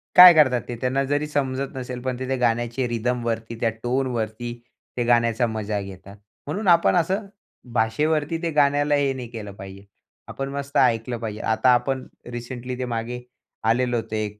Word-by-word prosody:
काय 180 -1 +12
करतात 130 -6 +4
ते 120 - -4
त्यांना 130 +1 +1
जरी 145 +1 +1
समजत 135 -2 -2
नसेल, 125 -1 -5
पण 130 -1 -3
ते 130 - -4
त्या 135 - 0
गाण्याचे 120 +1 0
रिदमवरती, 115 -1 -2
त्या 115 - +2
टोनवरती 120 -2 -2 0.4
ते 120 - +1
गाण्याचा 120 0 +3
मजा 110 -2 -2
घेतात. 100 0 -10 0.3
म्हणून 195 +8 -3
आपण 170 0 +5
असं 185 +5 +1 0.5
भाषेवरती 150 +7 +1
ते 165 - 0
गाण्याला 145 0 +3
हे 140 -1 +1
नाही 125 -2 -6
केलं 110 -4 -7
पाहिजे. 95 0 -10 0.4
आपण 135 0 -5
मस्त 140 0 -3
ऐकलं 115 +1 +2
पाहिजे. 110 -2 -5
आता 110 +3 +2
आपण 130 +2 0 0.2
रिसेंटली 125 +1 -6
ते 130 - -1
मागे 120 +1 -4 0.5
आलेलं 120 +1 +2
होतं 110 -1 -4
एक 105 -1 -3
125 Hz, 165 wpm, -23 LUFS, 115-135 Hz, 0.5 s, काय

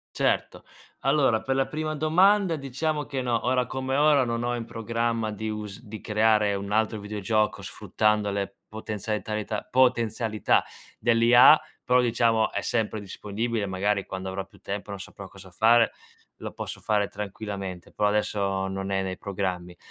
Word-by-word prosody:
Certo. - - 0 0.4
Allora, 135 -5 +3
per 135 - -1
la 135 0 +1
prima 155 0 -3
domanda 180 +4 +3
diciamo 150 +3 -2
che 135 -2 -3
no, 120 -2 -1
ora 125 0 +2
come 130 0 -2
ora 145 -2 +4
non 115 0 -2
ho 120 0 0
in 115 -1 -4
programma 115 -1 -2
di 110 +1 -4
us 105 -1 -6
di 110 -1 -9
creare 105 -1 +2
un 100 +1 -5
altro 110 0 +1
videogioco 105 +1 -1
sfruttando 105 -1 0
le 100 0 -3
potenzialitalità, 105 0 -4
potenzialità 115 -4 +2 0.4
dell'IA, 120 +5 +7 0.3
però 125 0 +4
diciamo 115 -2 +2
è 100 - -2
sempre 110 -1 -1
disponibile, 105 +2 -3
magari 100 +1 -1
quando 95 0 -6
avrò 95 0 -4
più - - -21
tempo 100 +1 -5
non 100 -1 -6
saprò 100 +1 -9
cosa 95 -1 -14
fare, 115 +3 +4 0.5
lo - - -6
posso - - -7
fare 105 -2 +1
tranquillamente, 100 -3 -6
però 105 - +1
adesso 100 -2 0
non 95 0 -4
è 95 0 +1
nei 95 -1 -4
programmi. 90 -3 -4
110 Hz, 155 wpm, -26 LUFS, 100-120 Hz, 0.5 s, dell'IA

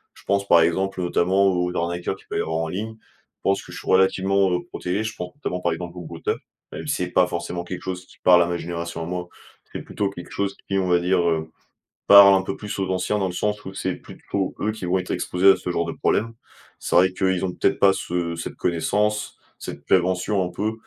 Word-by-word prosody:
Je - - -17
pense, 100 0 0
par 85 -3 +6
exemple, 95 +3 0
notamment 90 +2 +2
aux 90 -1 0
arnaqueurs 85 +1 -2
qui - - -20
peuvent - - -1
avoir 80 0 -2
en 80 0 -2
ligne. 110 +6 -4 0.4
Je - - -63
pense 95 0 +1
que - - -13
je - - -8
suis - - -10
relativement, 95 0 +3
heu, 90 0 0
protégé. 95 +4 -3
Je 110 -1 -4
pense 90 0 -6
notamment, 90 -11 -4
par 85 -2 +1
exemple, 85 +1 -7
aux - - -6
brouteurs, 85 - -3 0.3
même - - -7
si - - +1
c'est - - -2
pas 90 -1 +4
forcément 85 0 -4
quelque 90 0 -6
chose 90 -1 -5
qui - - -19
parle 90 -1 +7
à 85 - +2
ma 85 0 -1
génération 85 -1 -5
à - - -4
moi. 90 0 -4 0.4
C'est - - -5
plutôt 100 - -2
quelque 90 -3 -10
chose 100 -1 -2
qui, 95 0 0
on 95 - 0
va 90 - +4
dire, 90 +1 +2
heu, 80 -1 -2 0.6
parle 100 -1 +10
un 95 - +1
peu 95 - -4
plus 105 -1 -6
aux 95 - -1
anciens, 95 +3 0
dans 95 - 0
le 90 - -5
sens 105 +2 -2
où 95 - -7
c'est 95 -1 -2
plutôt 95 -2 -4
eux 110 - 0
qui 110 -4 -6
vont 95 +1 +1
être 90 - -5
exposés 95 +2 +3
à - - +4
ce 90 - -4
genre 85 -1 0
de 85 - -3
problème. 115 +2 0 0.5
C'est - - -2
vrai 90 +1 +6
qu'eux, 95 0 +1
ils 90 - -3
ont 90 - -2
peut-être 100 - +1
pas 100 -1 +6
ce 85 -2 -2
cette 85 - -5
connaissance, 105 +5 0 0.2
cette - - -8
prévention, 95 +2 +2
un 90 - -5
peu, 105 +4 -2
90 Hz, 245 wpm, -23 LUFS, 85-95 Hz, 0.6 s, parle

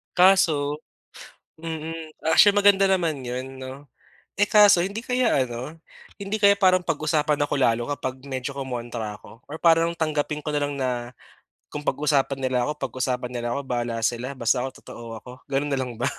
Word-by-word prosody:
Kaso 160 -6 +4 0.8
mm. 160 -1 -6 0.2
Actually, 205 +4 +6
maganda 200 -1 +5
naman 170 -7 0
'yon 130 +1 -6
'no. 130 +2 -8 0.6
Eh, 205 - +4
kaso 210 -5 +6
hindi 200 +4 -4
kaya 250 - +2
ano, 125 +6 -7 0.4
hindi 200 +2 -2
kaya 200 0 +6
parang 185 -2 +3
pag-usapan 150 -1 0
ako 145 - -2
lalo 120 -2 +2
kapag 130 -1 -5
medyo 130 +1 -4
kumontra 120 -5 -5
ako 115 - -15
or 150 - -6
parang 165 0 +4
tanggapin 150 -2 -1
ko 150 - -2
na 145 - 0
lang 145 0 -3
na, 130 -2 -1 0.8
kung 150 - -4
pag-usapan 140 -2 +1
nila 130 -2 0
ako, 150 0 -3
pag-usapan 125 0 -3
nila 120 -1 -3
ako 140 - -2
bahala 120 -2 -2
sila 125 +3 -2
basta 120 +1 +1 0.2
totoo 115 -1 -9
ako, 125 - -11 0.2
gano'n 140 +2 -1
na - - +1
lang 125 -2 -4
ba? - - -2
145 Hz, 165 wpm, -24 LUFS, 125-165 Hz, 0.8 s, Actually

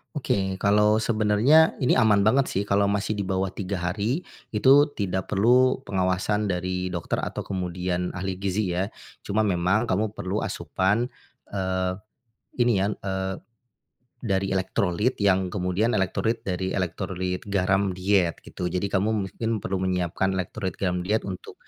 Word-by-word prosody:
Oke, 95 -8 -1
kalau 105 +1 +4
sebenarnya, 110 +8 +4
ini 130 - +3
aman 110 -4 +4
banget 120 +7 +4
sih, 100 -6 -2
kalau 100 +1 +3
masih 100 +1 0
di 100 - -2
bawah 95 0 -1
3 95 0 -4
hari, 105 - -1 0.3
itu 140 +7 +5
tidak 95 -4 -3
perlu 125 +6 +4
pengawasan 95 +2 0
dari 90 +1 -2
dokter 85 -2 -2
atau - - -3
kemudian 90 -1 -3
ahli 95 0 -3
gizi 95 -1 -1
ya, 95 +3 -1 0.3
cuma 105 +2 0
memang 100 +3 +1
kamu 105 +3 0
perlu 100 0 -3
asupan, 95 +8 0 0.4
eee, 95 -1 -1 0.7
ini 120 -4 +3
ya, 95 - +2
eee, 95 -1 -3 0.9
dari 95 -2 0
elektrolit, 95 +4 0
yang 95 -2 +3
kemudian 95 +5 0
elektrolit 110 +4 0
dari 95 -2 -2
elektrolit 90 +1 -3
garam 100 0 +1
diet 95 -2 +1
gitu, 90 - -5
jadi 90 +2 -2
kamu 100 +2 +1 0.2
mungkin 115 -2 -2
perlu 95 0 -2
menyiapkan 95 +1 0
elektrolit 95 0 -3
garam 90 -2 -2
diet 110 +3 +1
untuk, 95 -2 -7
95 Hz, 145 wpm, -25 LUFS, 90-105 Hz, 0.9 s, itu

